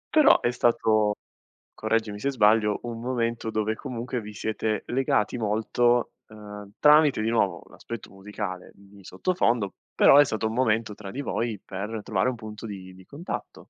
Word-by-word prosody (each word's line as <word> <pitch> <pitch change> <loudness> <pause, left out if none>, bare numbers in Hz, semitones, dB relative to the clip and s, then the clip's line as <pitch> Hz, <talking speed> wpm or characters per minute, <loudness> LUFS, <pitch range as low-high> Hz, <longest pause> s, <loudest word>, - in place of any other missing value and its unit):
Però 305 - +6
è 120 - +1
stato, 110 -3 +2 0.6
correggimi 110 -1 -1
se 140 +5 -1
sbaglio, 105 -3 +3
un 115 -1 -5
momento 115 -2 -2
dove 110 0 -1
comunque 125 -1 -5
vi 105 -1 -9
siete 110 0 -2
legati 125 -3 0
molto, 115 +2 +1 0.2
uhm, 105 -2 -10
tramite 150 -5 +5
di 110 - 0
nuovo 100 -7 +1
l'aspetto 115 -3 -9
musicale 95 -1 -7
di 100 0 -18
sottofondo, 115 - 0 0.2
però 140 - +6
è 145 - +8
stato 110 -3 -2
un 110 - -4
momento, 115 -3 0
tra 100 -2 -9
di 140 - -4
voi, 115 -6 -2
per 105 +3 -5
trovare 100 +2 0
un 130 - -3
punto 110 -1 -9
di 95 -3 -8
di 95 0 -16
contatto. 160 +6 -7
110 Hz, 160 wpm, -26 LUFS, 105-120 Hz, 0.6 s, è